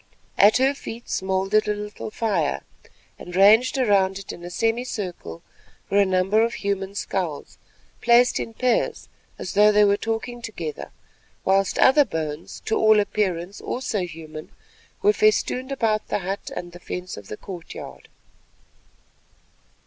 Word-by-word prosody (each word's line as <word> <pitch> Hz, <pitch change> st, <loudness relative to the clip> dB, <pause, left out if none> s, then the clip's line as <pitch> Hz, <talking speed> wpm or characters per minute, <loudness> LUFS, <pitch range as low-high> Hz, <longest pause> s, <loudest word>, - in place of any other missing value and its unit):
At 210 Hz, +3 st, +7 dB
her 265 Hz, +2 st, +3 dB
feet 235 Hz, -4 st, -9 dB
smouldered 190 Hz, +3 st, 0 dB
a 210 Hz, -, +1 dB
little 210 Hz, +1 st, -6 dB
fire, 200 Hz, -9 st, -1 dB, 0.6 s
and 175 Hz, 0 st, -8 dB
ranged 220 Hz, +8 st, +5 dB
around 195 Hz, -6 st, +2 dB
it 195 Hz, -, -7 dB
in 175 Hz, -, -10 dB
a 175 Hz, -, -6 dB
semi 225 Hz, +6 st, 0 dB
circle 180 Hz, -, -6 dB, 0.5 s
were 200 Hz, -, +4 dB
a 200 Hz, -, +4 dB
number 190 Hz, +3 st, +2 dB
of 235 Hz, +1 st, -1 dB
human 200 Hz, -1 st, -3 dB
skulls, 180 Hz, -7 st, -4 dB, 0.4 s
placed 240 Hz, +1 st, +4 dB
in 225 Hz, -, -5 dB
pairs 250 Hz, 0 st, 0 dB, 0.3 s
as 185 Hz, -, -6 dB
though 210 Hz, +1 st, +6 dB
they 210 Hz, 0 st, +5 dB
were 200 Hz, 0 st, +3 dB
talking 225 Hz, +2 st, -4 dB
together, 170 Hz, -10 st, -6 dB, 0.6 s
whilst 195 Hz, 0 st, +2 dB
other 290 Hz, +3 st, +6 dB
bones, 160 Hz, -, -5 dB
to 220 Hz, -, 0 dB
all 220 Hz, -1 st, +5 dB
appearance 195 Hz, -3 st, -1 dB
also 245 Hz, -4 st, -2 dB
human, 160 Hz, -3 st, -7 dB, 0.5 s
were 415 Hz, +1 st, +5 dB
festooned 350 Hz, -12 st, +1 dB
about 220 Hz, -5 st, 0 dB
the -, -, 0 dB
hut 195 Hz, +1 st, -4 dB
and 175 Hz, 0 st, -6 dB
the 175 Hz, -, -12 dB
fence 180 Hz, +1 st, -6 dB
of 100 Hz, -1 st, -11 dB
the 105 Hz, -, -7 dB
courtyard. 180 Hz, -4 st, -9 dB
200 Hz, 150 wpm, -23 LUFS, 180-225 Hz, 0.6 s, At